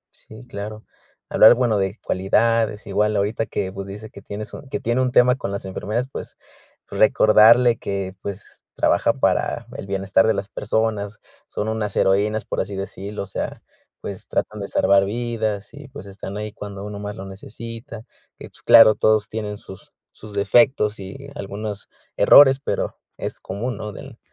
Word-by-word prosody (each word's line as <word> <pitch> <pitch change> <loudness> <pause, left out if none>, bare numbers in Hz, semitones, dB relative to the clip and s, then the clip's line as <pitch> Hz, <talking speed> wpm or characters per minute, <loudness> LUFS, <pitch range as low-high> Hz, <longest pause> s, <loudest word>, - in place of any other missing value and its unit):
Sí, 110 +3 -14
claro. 105 +2 -7 0.4
Hablar, 110 +3 +7
bueno, 120 -4 +1
de 95 +3 -2
cualidades. 110 +2 +1
Igual 105 +2 0
ahorita 105 +3 -1
que, 95 -2 -3
pues, 100 0 -6
dice, 105 +2 -9
que 100 - -12
tienes 105 +2 -7
un 135 - -10
que - - -3
tiene 120 +2 0
un 125 -1 0
tema 125 +1 +5
con 100 - -5
las 100 0 -5
enfermeras, 105 +6 -3
pues - - -8 0.5
recordarle 110 +3 +5
que, 100 -2 -4
pues, 100 0 -8
trabaja - - +2
para - - 0
el 100 - -7
bienestar 100 +3 +2
de 110 - +3
las 100 0 -4
personas. 105 -1 -2 0.3
Son 105 - -4
unas 110 -2 -2
heroínas, 105 +2 +1
por - - -2
así 100 +1 -5
decirlo. 100 +1 -5
O - - -7
sea, - - -5 0.4
pues, 100 -2 -7
tratan 105 0 -2
de 100 - -4
salvar 100 0 +3
vidas 110 0 -3
y, 145 0 -11
pues, 140 -2 -11
están 100 0 -8
ahí 105 0 -5
cuando 100 -1 -8
uno 105 -1 -7
más 105 0 -6
lo 95 - -8
necesita, 115 +3 -9 0.3
que - - -11
pues, - - -15
claro 110 -1 +8
todos 110 -1 +2
tienen 105 -2 -4
sus 95 -1 -11 0.2
sus 105 -1 -11
defectos 105 +1 +3
y 100 +9 -9
algunos 100 -2 -6 0.3
errores, 135 -1 +7
pero - - -3 0.2
es - - -5
común, 110 +4 -4
¿no?, 105 0 -6
del 135 +1 -11
105 Hz, 175 wpm, -22 LUFS, 100-115 Hz, 0.5 s, claro